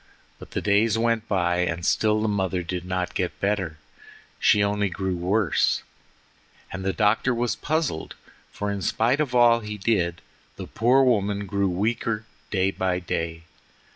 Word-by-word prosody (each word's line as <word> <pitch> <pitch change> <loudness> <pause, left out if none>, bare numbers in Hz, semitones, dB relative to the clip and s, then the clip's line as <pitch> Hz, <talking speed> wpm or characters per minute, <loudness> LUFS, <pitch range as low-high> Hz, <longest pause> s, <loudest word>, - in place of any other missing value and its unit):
But - - -11
the - - -4
days 105 +2 +3
went 115 -1 0
by 90 -3 +1
and 85 -1 -1
still 110 0 +2
the - - +1
mother 95 -3 -1
did 90 +1 -4
not 90 -1 -2
get - - -3
better; 95 -6 -1 0.6
she 105 - +4
only 100 0 0
grew 95 0 -2
worse, 90 +1 +1 0.9
and 95 +1 -5
the 95 - +1
doctor 105 +7 +2
was 120 0 0
puzzled, 155 - -2 0.4
for 105 0 -3
in 100 -1 -3
spite 120 +8 +1
of 140 -5 -1
all 120 -1 +6
he 105 -2 -6
did 90 -5 0 0.3
the - - -7
poor 125 +4 +3
woman 100 -5 +1
grew 100 0 0
weaker 110 +3 -1 0.2
day 95 -1 +1
by 95 -2 -1
day. 80 -2 -3
100 Hz, 160 wpm, -25 LUFS, 90-115 Hz, 0.9 s, all